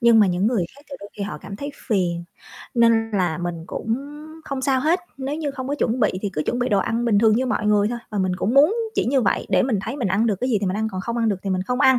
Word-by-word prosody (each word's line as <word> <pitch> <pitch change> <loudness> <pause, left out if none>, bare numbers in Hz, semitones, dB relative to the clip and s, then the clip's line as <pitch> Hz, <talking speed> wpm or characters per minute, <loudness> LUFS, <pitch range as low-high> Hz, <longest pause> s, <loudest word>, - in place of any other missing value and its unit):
nhưng 235 -2 +6
mà 205 - +6
những 180 +3 +1
người 220 -7 +1
khác - - -15
thì 275 - -6
đôi 200 - -9
khi 200 - -4
họ 205 - -4
cảm 200 - -8
thấy 285 +4 -5 0.2
phiền, 175 -6 0 0.5
nên 230 -1 +3
là 180 -5 0
mình 175 -2 -4
cũng 225 +4 -2 0.5
không 275 -1 -4
sao 265 -1 +2
hết. 330 +6 +2 0.2
Nếu 270 +1 -3
như 305 -2 -2
không 265 -1 -6
có 285 - 0
chuẩn 250 -3 0
bị 210 - +4
thì 200 - -1
cứ 155 - -1
chuẩn 245 - 0
bị 250 0 0
đồ 205 -5 +3
ăn 230 +5 0
bình 220 -4 +3
thường 220 0 +5
như 260 +1 +1
mọi 215 -4 -1
người 210 0 +3
thôi 240 - -3
và 210 - -3
mình 185 -1 0
cũng 215 +6 -1
muốn 300 +9 +6 0.2
chỉ - - +1
như 265 +3 +2
vậy - - +1
để - - +3
mình 240 -6 +1
thấy 265 - -4
mình 235 -9 -1
ăn 210 +5 +2
được 210 - +1
cái 255 - 0
gì 215 - +3
thì 200 - -1
mình 185 +2 -1
ăn, 220 0 0
còn 185 - -3
không 235 +4 -3
ăn 230 -1 +1
được 200 - +1
thì 195 - -3
mình 185 -1 0
không 250 +7 -2
ăn, 260 -2 +6
225 Hz, 315 wpm, -22 LUFS, 195-255 Hz, 0.5 s, nhưng